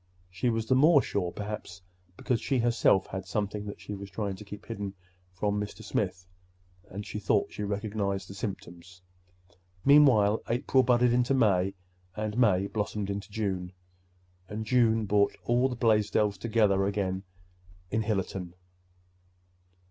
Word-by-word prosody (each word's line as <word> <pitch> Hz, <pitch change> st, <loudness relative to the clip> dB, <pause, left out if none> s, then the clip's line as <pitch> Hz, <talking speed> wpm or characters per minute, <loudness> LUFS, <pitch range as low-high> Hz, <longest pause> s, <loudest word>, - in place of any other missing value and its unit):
She 95 Hz, +7 st, 0 dB
was 115 Hz, -1 st, -1 dB
the 130 Hz, -, +2 dB
more 145 Hz, +2 st, +6 dB
sure, 90 Hz, -3 st, -2 dB
perhaps, 105 Hz, -4 st, -7 dB, 0.3 s
because 125 Hz, -4 st, -1 dB
she 135 Hz, -, 0 dB
herself 115 Hz, -5 st, +3 dB
had 95 Hz, 0 st, -6 dB
something 105 Hz, +1 st, -3 dB
that 100 Hz, -, -7 dB
she -, -, -7 dB
was 100 Hz, 0 st, -7 dB
trying 100 Hz, -2 st, -3 dB
to 105 Hz, -, -10 dB
keep 105 Hz, 0 st, -10 dB
from 100 Hz, -4 st, -5 dB, 0.7 s
Mr. 105 Hz, +2 st, -7 dB
Smith—and 90 Hz, 0 st, -6 dB
she 105 Hz, -, -5 dB
thought 100 Hz, -, +1 dB
she -, -, -7 dB
recognized 100 Hz, -1 st, -2 dB
the -, -, -9 dB
symptoms. 90 Hz, -4 st, -7 dB, 0.8 s
Meanwhile 125 Hz, -8 st, +6 dB
April 125 Hz, +2 st, +3 dB
budded 125 Hz, -1 st, +3 dB
into 125 Hz, +2 st, +2 dB
May, 100 Hz, -6 st, +2 dB, 0.4 s
and 110 Hz, 0 st, -3 dB
May 100 Hz, -6 st, +3 dB
blossomed 105 Hz, -1 st, -3 dB
into 100 Hz, +2 st, -5 dB
June; 95 Hz, -4 st, -3 dB, 0.8 s
and 110 Hz, +1 st, -4 dB
June 115 Hz, -2 st, +3 dB
brought 100 Hz, 0 st, +2 dB
all 125 Hz, +2 st, +2 dB
the 125 Hz, -, -4 dB
Blaisdells 105 Hz, -3 st, +2 dB
together 105 Hz, -4 st, +2 dB
again 95 Hz, -2 st, -1 dB, 0.7 s
in 110 Hz, -, +1 dB
Hillerton. 95 Hz, -4 st, -3 dB
105 Hz, 140 wpm, -29 LUFS, 95-115 Hz, 0.8 s, more